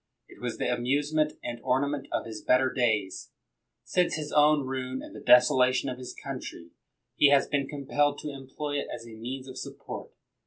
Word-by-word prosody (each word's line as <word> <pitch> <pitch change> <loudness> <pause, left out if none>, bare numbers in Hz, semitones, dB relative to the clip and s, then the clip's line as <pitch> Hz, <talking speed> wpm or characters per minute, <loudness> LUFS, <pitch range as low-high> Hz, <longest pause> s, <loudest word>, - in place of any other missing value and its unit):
It - - -16
was - - -3
the - - -1
amusement 145 +5 +1
and 120 -1 -4
ornament 135 +2 0
of - - -1
his 110 -2 -7
better 130 0 +3
days. 110 -7 0 0.5
Since 180 -1 +1
his 150 -1 -4
own 150 -1 +4
ruin 130 0 -4
and - - -11
the - - -7
desolation 130 0 +5
of 125 - -5
his 125 - -7
country, 85 0 -7 0.5
he 145 - +7
has 140 -1 +4
been 140 -2 0
compelled 145 0 0
to 150 - -4
employ 140 +2 -4
it - - -4
as 115 - -7
a 115 - -11
means 130 +4 -6
of 130 - -8
support. - - -7
135 Hz, 185 wpm, -28 LUFS, 125-145 Hz, 0.5 s, he